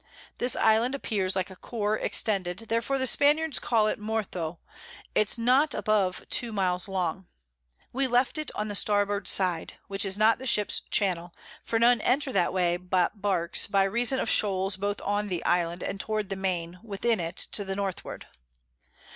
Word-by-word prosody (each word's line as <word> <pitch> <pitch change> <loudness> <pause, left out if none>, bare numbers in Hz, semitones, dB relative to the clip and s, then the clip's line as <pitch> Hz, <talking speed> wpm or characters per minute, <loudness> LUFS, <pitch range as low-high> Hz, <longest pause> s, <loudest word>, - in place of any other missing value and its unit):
This 245 0 +1
Island 230 +5 +3
appears 195 -8 -2
like 190 0 -2
a - - -10
Corps 210 +1 -2
extended, 190 -5 -1
therefore 230 +4 0
the 260 - 0
Spaniards 295 +3 +3
call 225 -3 +2
it 215 - -1
Mortho; 200 -6 -3 0.6
it's 215 +2 +1
not 255 +6 +3
above 200 -4 0
two 235 -2 +1
Miles 185 -3 0
long: 185 -1 -2 0.7
We 265 +2 +1
left 250 +4 +1
it 310 - -3
on 210 - -2
the 205 - -4
Starboard 205 -1 +2
side, 180 -4 0
which 195 0 +1
is 195 -1 0
not 220 +3 +4
the 260 - -6
Ships 210 -3 +2
Channel; 175 -4 0 0.3
for 225 - -1
none 235 0 +4
enter 270 +1 +1
that 175 - +2
way 175 -2 +1
but 180 +2 -1
Barks, 185 -4 +1
by 200 -1 +3
reason 240 +6 0
of - - -2
Shoals 195 -2 +1
both 200 +1 -2
on 205 +1 -1
the 180 -4 -4
Island 175 0 +1
and 195 - -4
towards 215 -1 -2
the 195 - -2
Main, 180 -2 -3
within 225 0 -1
it, 170 +1 -4
to 205 - -1
the 195 0 -4
Northward. 195 -2 -5
205 Hz, 175 wpm, -27 LUFS, 185-230 Hz, 0.7 s, not